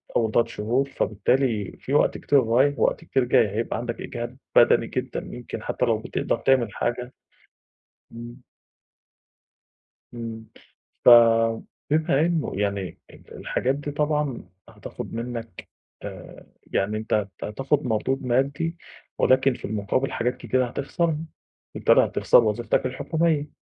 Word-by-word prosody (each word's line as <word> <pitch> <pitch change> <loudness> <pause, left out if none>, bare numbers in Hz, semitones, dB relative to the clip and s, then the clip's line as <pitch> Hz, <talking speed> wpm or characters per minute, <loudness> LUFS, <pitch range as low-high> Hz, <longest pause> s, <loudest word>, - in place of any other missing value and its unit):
أول 110 -2 +2
3 120 - +3
شهور، 125 +6 -1
فبالتالي 110 -2 0
في 135 - -5
وقت 145 - +3
كتير 140 -2 +3
رايح 130 +5 +2
ووقت - - +1
كتير 135 -5 0
جاي، 120 -3 +3
هيبقى 110 +4 -2
عَندك 120 0 -5
إجهاد 120 +1 -6 0.2
بدني - - +5
جدًا، - - -3
يمكن 120 -3 -7
حتى - - -1
لو 115 -2 +2
بِتقدَر 110 - -2
تعمل 120 -2 +2
حاجة. 125 +1 -3 1.0
إمم. 120 +2 -10 1.7
امم. 115 -1 -7 0.6
ف - - +9 0.8
بما 155 -2 +2
إنه 170 -3 -1
يعني 100 -2 -2
ال - - -16
الحاجات 130 +2 -1
دي 145 +1 -5
طبعًا 150 -3 -1 0.2
هتاخد - - -9
منك 115 -3 -6 0.4
آآ، - - -10 0.2
يعني 105 +2 -1
أنت 110 -2 -1 0.2
هتاخد 135 +7 -1
مردود 125 +4 -1
مادّي 140 +7 0 0.4
ولكن 130 +1 +3
في - - -8
المقابل 110 +6 -1
حاجات 125 +2 -1
كتيرة 130 0 0
هتخسَرها، 150 +6 -1 0.6
بالتالي - - +4
هتخسَر - - +4
وظيفتك 110 +2 0
الحكومية 155 +3 0
125 Hz, 125 wpm, -24 LUFS, 115-140 Hz, 1.7 s, ف